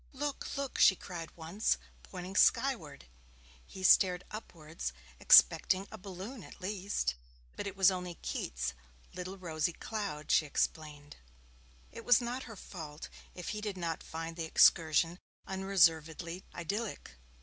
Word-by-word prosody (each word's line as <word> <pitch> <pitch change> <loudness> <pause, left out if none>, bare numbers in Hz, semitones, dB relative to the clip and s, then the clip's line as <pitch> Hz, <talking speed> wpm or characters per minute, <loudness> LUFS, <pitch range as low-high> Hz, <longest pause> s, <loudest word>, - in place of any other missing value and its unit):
'Look, 285 +1 -4
look!' 275 -1 -3
she 190 - +7
cried 175 -3 -7
once, 165 - 0 0.2
pointing 180 - -8
skyward. 175 - +2 0.6
He 190 - -9
stared 180 -1 +5
upwards, 160 - -6 0.3
expecting 190 +1 +6
a - - -8
balloon 195 +6 -8
at - - -13
least. 190 - -2 0.4
But - - -4
it 200 - -6
was 190 0 +6
only 180 -2 -4
'Keats' - - -3 0.4
little 185 +2 -6
rosy 170 -2 -2
cloud', 200 -9 -4
she 155 - +4
explained. 145 0 -3 0.7
It - - -9
was 245 -2 +6
not 245 +2 -4
her 225 - -8
fault 160 -6 -9 0.3
if 180 - -6
he 210 - -4
did 205 -3 -4
not 170 -2 -3
find 165 +1 -6
the 165 - -2
excursion 165 +2 +4 0.3
unreservedly 170 -2 +1
idyllic. 200 - -4
180 Hz, 135 wpm, -32 LUFS, 160-200 Hz, 0.7 s, she